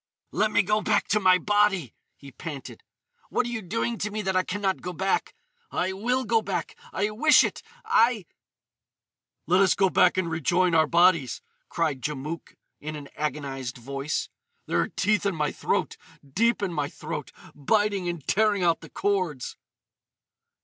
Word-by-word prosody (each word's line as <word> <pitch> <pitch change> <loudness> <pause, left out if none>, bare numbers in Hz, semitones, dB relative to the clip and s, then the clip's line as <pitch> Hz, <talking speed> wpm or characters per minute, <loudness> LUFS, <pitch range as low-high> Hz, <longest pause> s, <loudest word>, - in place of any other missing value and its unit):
"Let 215 - +2
me 205 - +3
go 210 +3 +1
back 210 -1 +1
to 210 - +3
my 185 -2 +5
body!" 200 - +1 0.2
he 140 -1 -13
panted. 145 -2 -8 0.5
"What 250 - +1
are - - -3
you 235 -2 -3
doing 225 +4 -2
to 210 - -1
me 210 0 -4
that 190 -1 -1
I 185 - +4
can 195 +2 -4
not 195 -2 0
go 180 - -5
back? 190 +3 -1 0.3
I 185 +1 -1
will 250 +6 0
go 225 +1 +2
back! 195 -4 -3 0.2
I 205 +2 -1
wish 300 +8 +5
it!—I——" 250 - 0 1.2
"Let 180 +4 +4
us 190 -2 +4
go 190 -2 +2
back 180 0 +4
and 185 -2 +1
rejoin 170 +2 +1
our 160 -1 +4
bodies!" 170 -7 +3 0.3
cried 155 -6 -1
Djamouk 150 +3 -5 0.2
in 155 +1 -6
an 145 -1 -9
agonised 135 -4 -4
voice. 140 +4 -3 0.4
"There - - 0
are - - 0
teeth 210 0 +1
in 200 -3 0
my 150 -2 0
throat, - - -1 0.3
deep 225 - +1
in 185 -3 -1
my 145 -2 -1
throat, 150 -3 -6 0.2
biting 200 +4 +1
and 170 -5 -5
tearing 210 -2 +2
out 170 -2 +2
the - - -11
cords." 185 -10 -1
185 Hz, 170 wpm, -26 LUFS, 155-210 Hz, 1.2 s, my